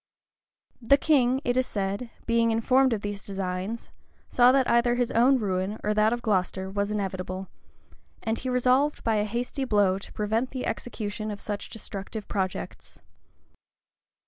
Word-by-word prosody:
The 260 +4 +5
king, 265 -4 +3
it 245 - +1
is 255 0 +2
said, 200 +4 -3 0.2
being 230 0 +3
informed 255 +4 +3
of 220 -3 -1
these 205 -1 -5
designs, 195 +3 -4 0.4
saw 245 0 +6
that 265 -1 +3
either 235 0 +3
his 245 -1 0
own 255 +4 +5
ruin, 195 -1 -1
or 210 - +1
that 215 +1 +3
of 240 0 -2
Glocester, 190 -2 0
was 200 +1 -1
inevitable; 190 -2 -3 0.7
and 225 0 -1
he 260 - -3
resolved 255 +4 +2
by 225 -2 +2
a 210 - +1
hasty 245 +5 -3
blow 205 -6 +2
to - - -11
prevent 220 +4 0
the 260 -2 -4
execution 215 -2 -4
of 205 -1 -5
such 205 -1 -5
destructive 205 -1 -7
projects. 190 -2 -4
220 Hz, 155 wpm, -27 LUFS, 200-245 Hz, 0.7 s, saw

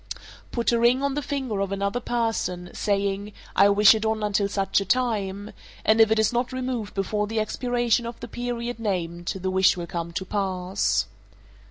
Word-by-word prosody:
Put 235 -1 0
a 235 - +2
ring 245 +3 +3
on 280 -1 +1
the 295 - -1
finger 265 -8 -3
of 195 -1 -1
another 200 +3 -1
person, 225 -8 -2
saying, 200 0 -1 0.2
"I 200 - +6
wish 205 +1 +7
it 220 -1 -2
on 220 -1 0
until 205 -1 +1
such 200 0 +1
a - - -3
time," 205 -3 -1 0.3
and 220 +1 +5
if 220 - +6
it 220 - +2
is 220 +2 +2
not 240 +2 0
removed 255 -5 -3
before 210 +2 -1
the 225 +1 -1
expiration 240 +1 0
of 235 - -7
the - - -7
period 240 0 -4
named, 175 -5 -3
the 190 0 -2
wish 190 0 +4
will 175 - -4
come 170 0 -4
to 190 - -3
pass. 190 -1 0
210 Hz, 190 wpm, -25 LUFS, 195-235 Hz, 0.3 s, wish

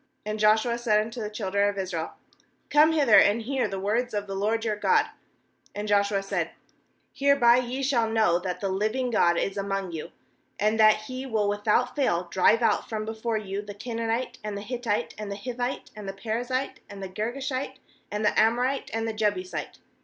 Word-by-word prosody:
9And 215 0 -3
Joshua 220 +3 +3
said 215 -3 +3
unto 225 +3 -4
the 210 - -3
children 200 -1 0
of 200 - -5
Israel: 180 -4 -3 0.6
'Come 305 +2 +6
hither, 280 -9 +6
and 215 +3 +3
hear 260 0 0
the 195 -1 -4
words 220 +4 -1
of 205 0 -1
the 195 - -6
LORD 220 +4 0
your 215 -1 0
God.' 435 - +3 0.7
10And 205 +1 -4
Joshua 200 -1 +2
said: 195 - -2 0.6
'Hereby 275 -4 +5
ye 255 +2 -2
shall 240 -5 +2
know 215 -6 +3
that 180 -1 -4
the 195 - -1
living 215 +6 -1
God 170 -6 +3
is 195 +3 -1
among 195 -2 -2
you, 160 -2 -6 0.5
and 215 +2 +1
that 215 0 +5
He 255 +3 -6
will 215 -4 0
without 205 +4 +1
fail 185 -12 +1
drive 215 +5 +4
out - - +1
from 215 -1 -3
before 220 +1 -2
you 200 -1 -4
the 205 -1 -9
Canaanite, 230 +2 -3
and 210 -1 -4
the - - -5
Hittite, 235 -1 -2
and 210 -1 -5
the - - -3
Hivite, 245 +3 -4
and 210 -2 -7
the - - -4
Perizzite, 245 +6 -3
and 200 -1 -8
the - - -3
Girgashite, 255 +7 -3 0.3
and 210 +1 -2
the - - +3
Amorite, 245 +5 +2
and 225 0 -1
the 225 - -2
Jebusite. 205 -4 -2
215 Hz, 190 wpm, -26 LUFS, 200-240 Hz, 0.7 s, Come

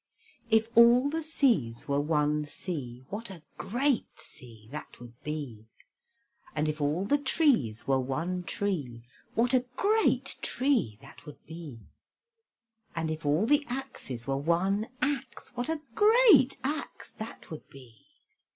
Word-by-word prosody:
If 220 0 +4
all 240 +4 +6
the 325 +1 -1
seas 235 - +1
were 140 0 +1
one 150 0 +1
sea, 130 -6 -6
What 215 +3 -5
a 175 -5 -10 0.2
great 245 +6 +1
sea 120 -8 -14
that 150 +1 -8
would 120 -1 -11
be! 135 -8 -6 0.9
And 155 0 +1
if 155 0 -2
all 150 +6 0
the 290 +7 +2
trees 260 - +2
were 135 -1 +2
one 165 +8 -2
tree, 150 -12 -3 0.3
What 240 +3 +2
a 255 -1 +4
great 435 +2 +2
tree 250 - 0
that - - -15
would 150 - -12
be! 155 -7 -9 1.1
And 160 -1 -1
if 155 -1 -4
all 155 +8 +3
the 295 +4 +4
axes 245 - -6
were 135 -1 -1
one 185 +8 +1 0.2
axe, 275 -3 -2
What 245 +3 -3
a 320 -2 -2
great 420 - +6
axe 295 +4 -4
that 220 -5 -9
would 155 - -9
be! 125 -5 -16
170 Hz, 140 wpm, -29 LUFS, -, 1.1 s, all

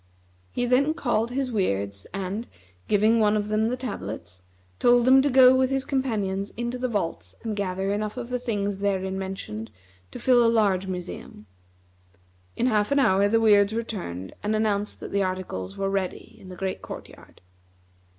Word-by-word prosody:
He 245 - -1
then 275 +6 +2
called 235 -7 0
his 260 0 -2
Weirds 100 - -1
and, 195 +4 -4 0.4
giving 215 +2 +3
one 210 -1 +3
of 210 0 -2
them 215 +1 +2
the 250 +2 -1
tablets, 90 - -6 0.4
told 245 0 +4
him 265 +1 +7
to 285 - +1
go 260 -1 +7
with 260 0 +3
his 270 0 -1
companions 205 -8 -1
into 240 +1 -3
the 255 - 0
vaults 95 - -3
and 220 -2 -3
gather 195 0 -1
enough 210 +2 -3
of 245 -1 -5
the 250 0 -1
things 205 -5 -2
therein 190 -1 -1
mentioned 115 - -6 0.4
to - - -9
fill 245 -2 +4
a 230 - +4
large 200 -5 +2
museum. 180 - -7 1.1
In - - 0
half 215 -1 +2
an 280 - +3
hour 200 -7 +4
the 225 +2 +3
Weirds 205 -2 +5
returned 175 - -5
and 210 +1 0
announced 210 -1 -1
that - - -7
the 200 - +1
articles 185 - -3
were 195 - -1
ready 195 -2 -3
in 185 - -12
the 185 - -8
great 190 0 -3
court - - -8
yard. - - -17
210 Hz, 180 wpm, -25 LUFS, 190-240 Hz, 1.1 s, him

